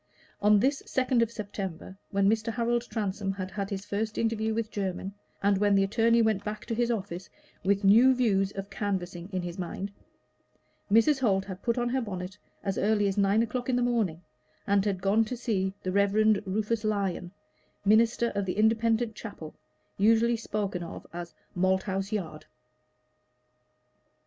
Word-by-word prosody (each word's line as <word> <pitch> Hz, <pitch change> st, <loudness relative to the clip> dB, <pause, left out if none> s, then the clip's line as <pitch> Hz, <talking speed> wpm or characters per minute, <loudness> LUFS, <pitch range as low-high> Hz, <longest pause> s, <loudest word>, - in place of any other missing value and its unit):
On 210 Hz, 0 st, +5 dB
this 275 Hz, +5 st, +1 dB
second 255 Hz, -2 st, +1 dB
of 230 Hz, -, +2 dB
September, 195 Hz, -5 st, -6 dB
when 195 Hz, 0 st, +2 dB
Mr. 220 Hz, +2 st, +1 dB
Harold 235 Hz, +1 st, 0 dB
Transome 200 Hz, -2 st, -2 dB
had 190 Hz, -1 st, -5 dB
had 200 Hz, +1 st, -3 dB
his 195 Hz, 0 st, -4 dB
first 215 Hz, +1 st, -3 dB
interview 220 Hz, -1 st, 0 dB
with 220 Hz, 0 st, -2 dB
Jermyn, 195 Hz, -1 st, -3 dB, 0.3 s
and 200 Hz, -1 st, +3 dB
when 205 Hz, -1 st, +3 dB
the 195 Hz, -, +4 dB
attorney 230 Hz, +3 st, +3 dB
went 215 Hz, -3 st, +1 dB
back 210 Hz, 0 st, -5 dB
to 235 Hz, -, -3 dB
his 240 Hz, +1 st, +1 dB
office 190 Hz, -5 st, -3 dB, 0.3 s
with 200 Hz, +2 st, +1 dB
new 235 Hz, +7 st, +6 dB
views 200 Hz, -6 st, +2 dB
of 195 Hz, 0 st, -6 dB
canvassing 185 Hz, -3 st, -3 dB
in 185 Hz, -2 st, -2 dB
his 175 Hz, +1 st, -6 dB
mind, 190 Hz, +3 st, -4 dB, 1.0 s
Mrs. 245 Hz, +7 st, +5 dB
Holt 195 Hz, -6 st, +2 dB
had 190 Hz, -1 st, -8 dB
put 235 Hz, 0 st, 0 dB
on 240 Hz, 0 st, +1 dB
her 260 Hz, +1 st, 0 dB
bonnet 185 Hz, -4 st, -5 dB, 0.3 s
as 195 Hz, -1 st, -1 dB
early 205 Hz, -1 st, +2 dB
as 195 Hz, -, -1 dB
nine 200 Hz, +2 st, +3 dB
o'clock 250 Hz, +2 st, -3 dB
in 255 Hz, -, +2 dB
the 245 Hz, -, +2 dB
morning, 215 Hz, -9 st, 0 dB, 0.4 s
and 200 Hz, -1 st, +3 dB
had 190 Hz, -3 st, -1 dB
gone 205 Hz, +3 st, +4 dB
to 245 Hz, +3 st, -5 dB
see 190 Hz, -5 st, -1 dB
the 185 Hz, -, -1 dB
Reverend 200 Hz, +2 st, +3 dB
Rufus 215 Hz, +3 st, -1 dB
Lyon, 195 Hz, -4 st, -1 dB, 0.5 s
minister 230 Hz, +3 st, +4 dB
of 200 Hz, -, -1 dB
the 180 Hz, -, -2 dB
Independent 225 Hz, +1 st, +2 dB
Chapel 200 Hz, -8 st, -8 dB, 0.5 s
usually 225 Hz, +3 st, +4 dB
spoken 205 Hz, -4 st, -3 dB
of 170 Hz, -, -8 dB
as 175 Hz, 0 st, -7 dB, 0.2 s
"Malthouse 190 Hz, +2 st, 0 dB
Yard." 165 Hz, -8 st, -4 dB
205 Hz, 170 wpm, -28 LUFS, 195-225 Hz, 1.0 s, new